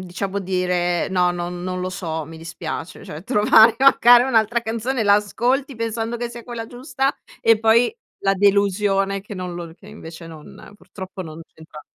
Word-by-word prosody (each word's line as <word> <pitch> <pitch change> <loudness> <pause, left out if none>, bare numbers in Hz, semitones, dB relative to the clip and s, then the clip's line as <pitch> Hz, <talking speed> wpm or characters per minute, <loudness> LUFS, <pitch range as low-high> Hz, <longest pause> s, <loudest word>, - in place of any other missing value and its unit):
diciamo 195 +2 -4
dire: 180 -2 -1
"No, 180 -1 +2
non 175 0 -5
non 185 0 -4
lo 185 - -3
so, 160 -4 -4
mi 160 +2 -11
dispiace", 160 0 -7
cioè 150 +2 -9
trovare 220 +3 +5
magari 245 -2 +6
un'altra 235 -2 +2
canzone, 230 +1 -2
la 200 - +6
ascolti 250 +6 -1
pensando 230 +1 -3
che 240 0 -4
sia 235 0 -10
quella 235 -2 -7
giusta 270 +2 -2 0.3
e 225 -1 +4
poi 230 - +3 0.3
la 195 0 +2
delusione 195 0 +1
che 205 +2 -10
non 180 -2 -6
lo 170 -2 -7
che 195 - -19
invece 170 -6 -11
non 160 +4 -13
purtroppo 190 -2 -9
non 160 -1 -10
c'entra. 160 -1 -14
200 Hz, 170 wpm, -21 LUFS, 175-230 Hz, 0.3 s, magari